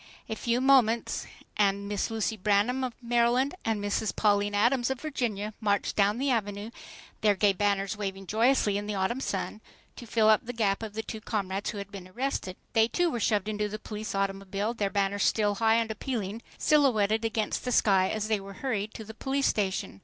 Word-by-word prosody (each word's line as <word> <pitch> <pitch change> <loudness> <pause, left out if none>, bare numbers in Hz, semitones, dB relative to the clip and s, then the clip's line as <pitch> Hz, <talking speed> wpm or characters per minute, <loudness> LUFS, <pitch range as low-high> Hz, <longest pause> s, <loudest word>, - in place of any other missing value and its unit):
A 220 - -3
few 235 +2 0
moments 250 -4 +3 0.3
and 200 -1 +2
Miss 205 -1 -1
Lucy 225 0 -1
Branham 210 +6 +1
of 250 -2 -2
Maryland 240 +3 +2
and 225 -2 0
Mrs. 205 +1 -1
Pauline 205 -1 +2
Adams 240 +4 +2
of 265 -1 -2
Virginia 225 -9 -3
marched 205 -2 0
down 205 +1 +3
the 270 +1 +1
Avenue, 205 -1 -2 0.5
their 210 -1 +4
gay 200 +1 +3
banners 200 +1 0
waving 195 -2 -5
joyously 220 -1 +2
in 205 - -6
the 210 - -2
autumn 195 +6 0
sun, 220 -4 -3 0.4
to 240 - -9
fill 220 0 +3
up 215 -1 +5
the 245 - -6
gap 210 -4 0
of 220 -2 -6
the 220 - -2
two 220 0 -7
comrades 200 -3 -2
who 215 - -5
had 200 0 -7
been 195 -2 -8
arrested. 190 -3 -3 0.2
They, 225 -1 +4
too, 350 +6 +1
were 240 - -2
shoved 210 -2 +1
into 210 -1 -1
the 215 - -4
police 215 -1 -6
automobile, 195 +2 -1
their 205 -4 -1
banners 200 0 0
still 210 -2 +2
high 225 0 +5
and 230 -1 +1
appealing, 220 -2 -4 0.2
silhouetted 225 -8 +3
against 220 -1 -1
the 250 - -2
sky 190 -5 +4
as 215 -1 -2
they 215 -2 +1
were 195 0 -9
hurried 215 -2 -3
to 220 - -6
the 220 +1 -10
police 270 +4 -1
station. 190 - -1
215 Hz, 200 wpm, -28 LUFS, 200-235 Hz, 0.5 s, up